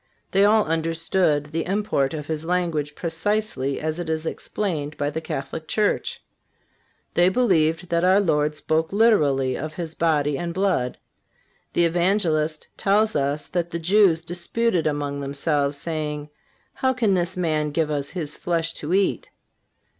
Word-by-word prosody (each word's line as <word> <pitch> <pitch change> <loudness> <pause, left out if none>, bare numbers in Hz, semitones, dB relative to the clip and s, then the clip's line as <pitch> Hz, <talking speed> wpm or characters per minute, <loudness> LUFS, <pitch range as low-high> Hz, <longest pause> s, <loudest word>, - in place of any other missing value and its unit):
They 195 +1 +4
all 215 +1 +4
understood 165 -1 0
the 165 0 -1
import 180 -7 0
of 150 -2 -5
His 155 0 -3
language 165 -4 -1
precisely 165 -5 -1
as 155 +2 -3
it 170 -2 -4
is 160 0 -2
explained 160 -5 -3
by 145 0 -1
the 160 +2 -3
Catholic 155 +1 -5
Church. 210 -1 0 0.9
They 175 +1 +5
believed 180 -6 +2
that 170 0 +1
our 185 +2 +5
Lord 150 -5 +1
spoke 160 +1 0
literally 150 - +3
of 155 0 -5
His 165 -2 -5
body 150 -4 +1
and 170 -1 -4
blood. 185 -10 0 0.8
The 170 - +3
Evangelist 165 -3 +1
tells 215 +2 +2
us 145 +1 0
that 175 -1 -1
the 170 - -3
Jews 175 -1 +3
"disputed 175 +2 0
among 145 -1 -2
themselves, 140 0 0
saying: 150 -1 -4 0.4
How 260 0 +1
can 230 -6 +2
this 180 0 -1
man 155 -4 0
give 155 +1 0
us 140 -1 -2
His 155 -5 -4
flesh 165 -1 -1
to 160 +5 0
eat?" 195 -1 +1
165 Hz, 150 wpm, -23 LUFS, 150-185 Hz, 0.9 s, They